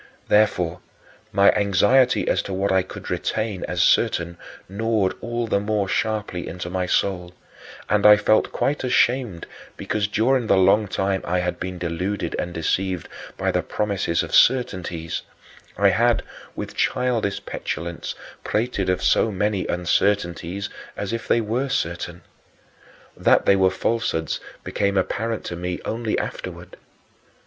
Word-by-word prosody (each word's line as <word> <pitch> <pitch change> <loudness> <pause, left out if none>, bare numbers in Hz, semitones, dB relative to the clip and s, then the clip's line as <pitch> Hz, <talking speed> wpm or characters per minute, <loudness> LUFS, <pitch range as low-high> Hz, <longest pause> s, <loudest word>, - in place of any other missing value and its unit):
Therefore, 90 -5 +2 0.5
my 100 0 +5
anxiety 105 +6 +3
as - - +2
to 100 - -6
what 100 +1 0
I 95 0 +4
could 95 - -8
retain 110 -4 -2
as 90 0 +1
certain 85 0 +2 0.3
gnawed 105 -1 0
all 120 0 -2
the 105 -3 +1
more 105 -1 -1
sharply 105 -4 -2
into 90 0 -6
my 90 0 -1
soul, 90 -1 0 0.5
and 105 -1 +2
I 105 0 +9
felt 110 +1 +2
quite 145 0 -1
ashamed 125 -7 +1 0.3
because 105 -1 -1
during 120 +3 +1
the 100 - +4
long 100 +3 +4
time 95 0 -1
I 90 +2 -1
had 90 0 -2
been 90 0 -4
deluded 90 +1 -3
and 90 - -3
deceived 90 +1 -1 0.3
by - - 0
the - - +1
[Manichean] - - -7
promises 100 -5 0
of - - -7
certainties, 90 -10 +2 0.6
I 100 -1 +5
had, 115 +3 +2 0.3
with - - -5
childish 120 -5 0
petulance, 85 0 -4 0.3
prated 105 -4 -1
of 90 0 0
so 110 - +3
many 100 0 -1
uncertainties 90 +1 0 0.3
as 100 +2 -3
if 115 - -4
they 115 - +3
were 120 +6 -1
certain. 85 -7 -3 0.9
That - - +3
they 100 - +5
were 95 -1 +4
falsehoods 95 -4 -1 0.2
became 100 -1 0
apparent 115 +4 -1
to 85 - -4
me 90 +1 -4
only 115 -1 -1
afterward. - - -6
100 Hz, 145 wpm, -23 LUFS, 90-110 Hz, 0.9 s, I